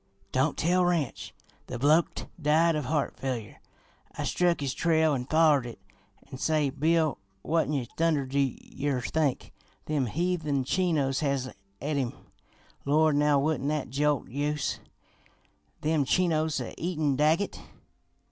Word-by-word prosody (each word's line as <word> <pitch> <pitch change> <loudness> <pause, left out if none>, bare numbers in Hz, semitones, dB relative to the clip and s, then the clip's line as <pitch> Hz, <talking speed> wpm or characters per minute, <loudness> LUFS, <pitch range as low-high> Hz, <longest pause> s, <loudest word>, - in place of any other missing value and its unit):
Don't - - +1
tell 180 +3 +2
Ranch; 170 -7 -1 0.4
the 125 - -5
bloke'd 150 +6 +2 0.2
die 155 +3 +4
of 150 -4 -2
heart 150 -1 -1
failure. 125 -5 -4 0.6
I - - -2
struck 175 -1 +1
his 140 -2 -2
trail 160 -1 +2
an' 125 -2 -2
follered 155 -5 +4
it 120 - -9 0.5
an' 130 - -7
say, 150 -3 +1
Bill, 155 -1 +1 0.2
what'n 150 -5 0
thunder 160 -4 +2
do 135 +2 -1
yer 135 0 -2
think? 145 +2 -1 0.3
Them 145 -4 0
heathen 160 -1 -1
Chinos 145 -3 +1
has 140 -3 -1 0.3
et 145 +2 -2
him!' 130 -4 -1 0.7
Lord, 155 +1 +3
now, 150 -1 +4
wouldn't 145 -1 0
that 150 -4 -2
jolt 145 +1 +1
youse? 145 +3 -2 1.0
Them 155 -1 +1
Chinos 160 0 +1
a - - -5
eatin' 155 -5 0
Daggett! 155 +7 +1
150 Hz, 135 wpm, -28 LUFS, 135-160 Hz, 1.0 s, die